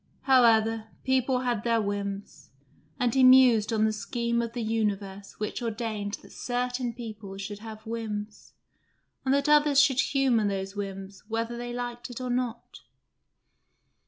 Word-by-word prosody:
However, 225 -4 +4 0.2
people 260 -1 +1
had 240 -4 -1
their 230 -1 +2
whims, 200 -7 -4 0.5
and 245 -2 +1
he 265 - +4
mused 255 -4 +6
on 220 -1 +2
the 220 - +1
scheme 235 +2 -1
of 230 0 -4
the 240 -1 -3
universe 205 -3 -2
which 215 +3 -3
ordained 215 -3 -3
that - - -15
certain 245 0 -2
people 215 -4 -8
should 205 +1 -6
have 220 0 -10
whims, 215 -2 -5 0.7
and 260 - +2
that 280 +1 +1
others 295 -1 +5
should 280 -3 +4
humour 260 -7 +2
those 195 0 -3
whims 195 -1 -6
whether 230 +1 -2
they 240 0 -5
liked 240 0 -5
it 245 - -7
or 255 -1 -3
not. 245 -1 -3
230 Hz, 150 wpm, -27 LUFS, 210-245 Hz, 0.7 s, mused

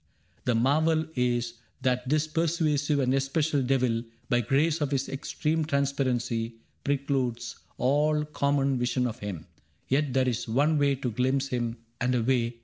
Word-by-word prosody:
The 125 - +2
marvel 155 +6 +3
is 120 -2 0 0.3
That 125 -1 0
this 155 +1 +2
persuasive 155 -2 +1
and 130 -2 +2
especial 140 +2 +1
devil. 125 -3 +1 0.3
By 120 0 +3
grace 150 +7 +1
of 145 - +1
his 135 -1 -1
extreme 155 +3 -1
transparency. 130 -5 0 0.3
Precludes 135 -4 -1 0.2
all 150 +4 +2
common 140 -3 +1
vision 125 +1 +1
of 120 0 -3
him; 95 -6 -5 0.4
yet 140 0 +1
There 130 0 +2
is 120 -1 -1
one 145 +7 +2
way 140 -1 +3
to 130 -2 -3
glimpse 130 +4 0
him 120 -2 -2 0.2
and 125 0 +1
a 120 - +1
way. 120 -1 +1
135 Hz, 150 wpm, -28 LUFS, 125-145 Hz, 0.4 s, marvel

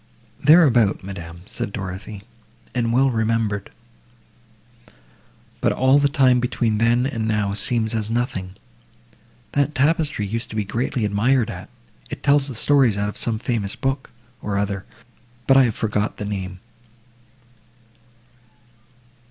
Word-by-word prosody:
"Thereabout, 135 - +5
madam," 85 -3 -8
said 100 - -5
Dorothée, 100 +1 -6 0.5
"and 115 -2 0
well 130 +3 +3
remembered, 110 -3 -1 1.9
but - - +2
all 130 +2 +4
the 145 0 +3
time 130 -3 +4
between 120 -3 0
then 120 +2 +3
and 115 -6 -2
now 105 -2 0
seems 110 +2 +1
as 110 -1 -1
nothing. 105 -6 -2 1.0
That 145 +1 0
tapestry 145 -5 +1
used 115 +4 -4
to - - -8
be 105 - 0
greatly 115 +2 -2
admired 110 +4 +1
at, - - -9 0.4
it - - -7
tells 140 -1 +3
the 130 - -5
stories 130 -3 +4
out 105 0 -1
of - - -8
some 115 -2 -1
famous 110 -3 -2
book, 135 0 -2 0.3
or 100 -1 -2
other, 100 -1 -2 0.6
but 135 - +5
I 135 -1 +7
have 115 - -1
forgot 105 -1 -1
the 105 - -5
name." 95 -2 -5
115 Hz, 135 wpm, -22 LUFS, 100-130 Hz, 1.9 s, I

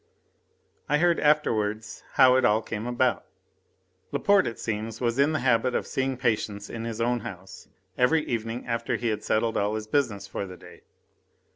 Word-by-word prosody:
I 150 - +3
heard 170 +1 +3
afterwards 110 -8 +1
how 130 -3 +6
it 130 - +3
all 110 +1 +3
came 110 +1 -5
about. 120 -1 +1 0.9
Laporte, 200 -1 +3
it 115 - -5
seems, 110 0 -4
was 120 +1 -1
in 140 +2 +4
the 155 -4 -1
habit 125 0 +2
of - - 0
seeing 135 -1 -2
patients 110 -4 -1
in 115 0 -5
his 115 -1 -5
own 120 +1 +1
house 95 -3 -10 0.3
every 150 +5 +3
evening 115 +1 -3
after 115 -1 -1
he 120 - -1
had 105 -1 -2
settled 110 +1 0
all 105 +1 0
his 110 0 -4
business 110 -5 0
for 100 0 -5
the 90 -1 -10
day. - - -15
115 Hz, 175 wpm, -26 LUFS, 110-130 Hz, 0.9 s, how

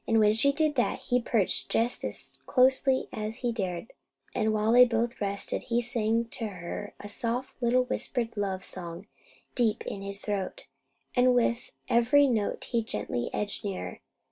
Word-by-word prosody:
When 220 -2 +5
she 260 +6 +4
did 305 +1 +1
that, 245 - +1
he 250 0 +1
perched 225 -5 +1
just 235 +2 +1
as - - -4
closely 260 0 +3
as 215 +1 -4
he 240 - +2
dared; 190 -2 -4 0.4
and 220 -2 +1
while 215 +1 +2
they 245 +1 +9
both 235 -1 0
rested, 200 0 -1
he 235 0 +2
sang 230 -1 0
to 225 - -2
her 180 -4 -6
a 205 - -7
soft 240 +4 -3
little 245 +1 +3
whispered 240 -2 -2
love 195 -2 -2
song, 175 +1 -7 0.5
deep 230 -4 +1
in 195 - -5
his 200 0 -4
throat; 200 -3 -3 0.5
and 250 0 +5
with 235 0 +1 0.2
every 250 +5 +5
note 225 -6 0
he 235 - +2
gently 120 - -3
edged 210 +2 -2
nearer. 185 - -4
225 Hz, 165 wpm, -29 LUFS, 205-245 Hz, 0.5 s, they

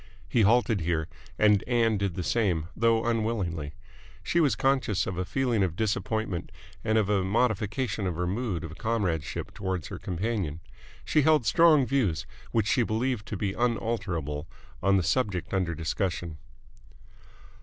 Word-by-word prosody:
He 120 - +2
halted 110 -1 +3
here, 80 -1 0 0.3
and 105 -2 +4
Ann 115 -4 +2
did 100 -4 -1
the 90 - -3
same, 90 -7 0
though 115 0 +2
unwillingly. 105 -10 -1 0.5
She 170 - +1
was 145 -10 +3
conscious 125 -6 +1
of 95 - -3
a 90 +1 -2
feeling 125 -1 0
of 90 -3 0
disappointment 110 -2 -2 0.3
and 110 0 +2
of 105 -3 +2
a 100 -2 +2
modification 105 +1 0
of 90 - -2
her 90 +2 -1
mood 95 -2 -2
of 80 +2 -8
comradeship 100 -10 -2
towards 95 -4 -3
her - - -6
companion. 95 -4 -2 0.5
She 155 - +3
held 155 -4 +4
strong 155 +3 +5
views, 110 - 0 0.3
which 110 -3 +2
she 115 - +2
believed 115 0 -1
to 105 - -4
be 100 +1 -1
unalterable, 100 - -2 0.3
on 100 +1 +4
the 95 - +1
subject 100 -1 -1
under 90 -3 0
discussion. 85 -1 -3
105 Hz, 155 wpm, -28 LUFS, 90-115 Hz, 0.5 s, strong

